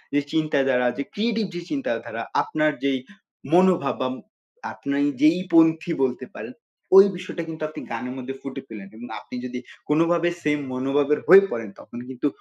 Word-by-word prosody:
যে - - +5
চিন্তাধারা, 135 -5 +2
যে 140 - -1
ক্রিয়েটিভ 225 0 0
যে 175 - -4
চিন্তাধারা 275 -2 -3 0.2
আপনার 155 0 +1
যেই 135 -2 +1 0.5
মনোভাব 180 -6 +4
বা 130 - +1 0.7
আপনাই 140 +1 -1 0.2
যেই 160 +4 +5
পন্থী 160 +1 +4
বলতে 125 -1 -1
পারেন - - -7 0.4
ওই 195 - +11
বিষয়টা 180 -1 -6
কিন্তু 160 -1 -6
আপনি 155 - -8
গানের 125 +2 -4
মধ্যে 130 +1 -5
ফুটে 135 0 -6
ফেলেন 100 -3 -9
এবং 120 - -9
আপনি - - -10
যদি 125 0 -5 0.3
কোনভাবে 165 +3 +3
সেম 150 -1 +1
মনোভাবের 140 +3 +1
হয়ে 195 +3 +10
পড়েন 115 -3 -4
তখন 120 - -10
কিন্তু 130 +3 -2
150 Hz, 160 wpm, -23 LUFS, 130-170 Hz, 0.7 s, ওই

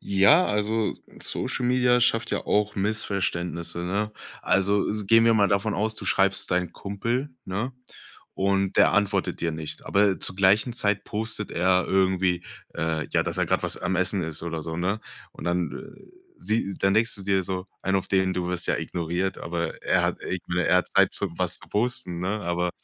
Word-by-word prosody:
Ja, 100 - +5
also, 105 +1 0 0.3
Social 125 - -2
Media 125 0 +3
schafft 120 -1 +1
ja - - -2
auch 105 0 +1
Missverständnisse, 90 -5 -2
ne? 100 +5 -2 0.3
Also 100 +1 +2
s 105 -1 -3
gehen 115 +2 +6
wir 115 -1 +5
mal 100 -2 +4
davon 100 +2 +1
aus, 110 +2 0
du - - -7
schreibst 95 -1 +2
deinem 90 0 0
Kumpel, 115 +8 -3
ne? 110 +8 -3 0.6
Und 95 0 0
der - - +5
antwortet 100 -1 0
dir 85 - 0
nicht. 80 -1 -6
Aber 100 -1 +3
zur 95 - -1
gleichen 100 +5 +3
Zeit 105 -4 0
postet 110 0 -3
er 90 +1 +2
irgendwie, 95 -2 +1 0.3
äh, 80 -1 -1
ja, - - +2
dass - - -3
er - - +1
grad - - +1
was - - -1
am 90 +1 -1
Essen 95 +1 +2
ist 80 -1 -3
oder 80 -1 -4
so, 80 +1 -4
ne? 95 +5 -1 0.3
Und - - -10
dann, 85 0 0
äh, 205 +1 -10 0.4
sie 110 -3 -1
dann 95 0 +2
denkst 115 +2 +3
du 100 - -9
dir 95 -1 +1
so, 95 +1 -4 0.2
einen 95 0 +1
auf 95 - -2
den, 95 -1 +2
du 90 -1 -2
wirst 90 -1 -1
ja - - +1
ignoriert, 90 +3 -2
aber 85 0 -4
er - - +2
hat - - 0
ir 95 - -3 0.3
er - - +5
hat 90 - +1
Zeit, - - +5
zum - - -2
was - - 0
posten, 105 -6 0
ne? 90 - -2
Aber 90 0 -1
95 Hz, 190 wpm, -25 LUFS, 90-105 Hz, 0.6 s, gehen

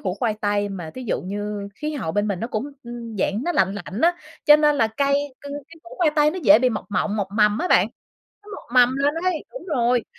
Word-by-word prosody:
củ 185 -2 -2
khoai 220 -1 -1
tây, 205 0 0
mà 175 -5 -6
thí 255 - -7
dụ 235 - -2
như 205 +1 -4
khí 305 +5 -4
hậu 160 - -3
bên 205 +2 0
mình 190 -3 -2
nó 230 - -2
cũng, 255 +5 -4
ừm, 235 -2 -8
dạng 205 +5 0
nó 350 - 0
lạnh 195 - +2
lạnh 200 +1 -6
á, 345 +1 +3 0.3
cho 295 -1 +8
nên 300 -1 +3
là 225 -5 +3
cây 280 +5 0 0.3
c - - -61
cái 290 +3 -9
củ 345 - -12
khoai 335 -4 +3
tây 300 0 +5
nó 370 - -5
dễ 210 -2 +7
bị 250 0 +2
mọc 215 - -4
mộng, 205 +2 0
mọc 195 -2 -2
mầm 210 +1 +4
á 360 - -1
bạn. - - +5 0.6
Nó 415 - -17
mọc - - -12
mầm 250 +1 +5
lên 285 +2 +1
ấy. 360 -4 0
Đúng - - -9
rồi, 245 - +1
235 Hz, 260 wpm, -22 LUFS, 205-290 Hz, 0.6 s, cho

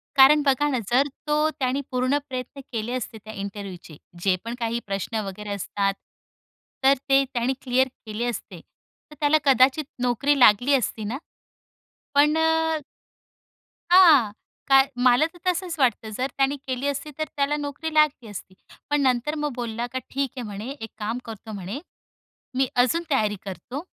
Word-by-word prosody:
कारण 285 +2 +7
बघा 280 +1 +3
ना, 255 -4 0
जर 270 +3 +4 0.2
तो 300 +1 +2
त्याने 275 -2 -1
पूर्ण 255 +3 +1
प्रयत्न 255 +2 -6
केले 230 +1 -3
असते 240 -3 -4
त्या 220 - -9
इंटरव्ह्यूचे 195 -6 -7 0.3
जे 190 -2 +3
पण 235 +1 -4
काही 230 0 -1
प्रश्न 200 +3 -2
वगैरे 205 +2 -7
असतात. 200 0 -1 0.9
तर 270 +1 +7 0.2
ते 275 0 +5
त्याने 245 +2 0
क्लिअर 260 0 +2 0.2
केले 215 +2 -3
असते. 240 -1 -5 0.5
तर - - -11
त्याला 300 +1 +4
कदाचित 270 +2 +4 0.2
नोकरी 275 +4 +2
लागली 245 +4 +6
असती 230 -4 0
ना? 230 +6 -3 1.0
पण 295 +2 +5
अ 320 0 +2 1.1
हां, 310 - +7 0.4
कार 270 0 +6
मला 250 +3 +4
तर 350 - -16
तसंच 360 -1 0
वाटतं. 235 -3 +1
जर 250 +5 -2
त्याने 275 +1 +2
केली 260 +2 -2
असती, 285 +2 -3
तर 310 - 0
त्याला 285 +1 +1
नोकरी 295 +2 -4
लागली 300 -7 +2
असती. 190 -1 -9 0.4
पण 295 0 +2
नंतर 260 +4 +1
मग 295 -3 -1
बोलला 235 0 -3
का 260 - -1
"ठीक 275 -1 -1
आहे," 245 - -3
म्हणे, 205 +4 -6
"एक 225 - -5
काम 220 +3 -3
करतो," 220 -1 -9
म्हणे 195 +10 -5 0.8
"मी 265 0 +3 0.2
अजून 330 +7 +1
तयारी 210 -6 +1
करतो. 245 +9 -6
255 Hz, 160 wpm, -24 LUFS, 225-285 Hz, 1.1 s, कारण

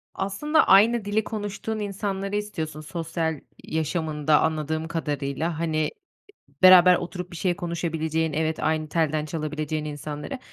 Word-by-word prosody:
Aslında, 300 +12 +1
aynı 215 +3 +5
dili 210 +2 +1
konuştuğun 215 +1 -4
insanları 200 -1 -3
istiyorsun, 160 -7 -4
sosyal 160 -1 -3 0.2
yaşamında 155 -1 0
anladığım 160 0 -1
kadarıyla. 155 0 -2
Hani, 155 -2 0
i - - -7 0.7
beraber 180 -1 +9
oturup 180 0 -5
bir - - -9
şey 180 0 0
konuşabileceğin, 160 -2 -2
evet, 160 +1 -1
aynı 155 -1 0
telden 155 -1 0
çalabileceğin 155 -1 -3
insanları. 150 - -6
160 Hz, 125 wpm, -25 LUFS, 155-190 Hz, 0.7 s, beraber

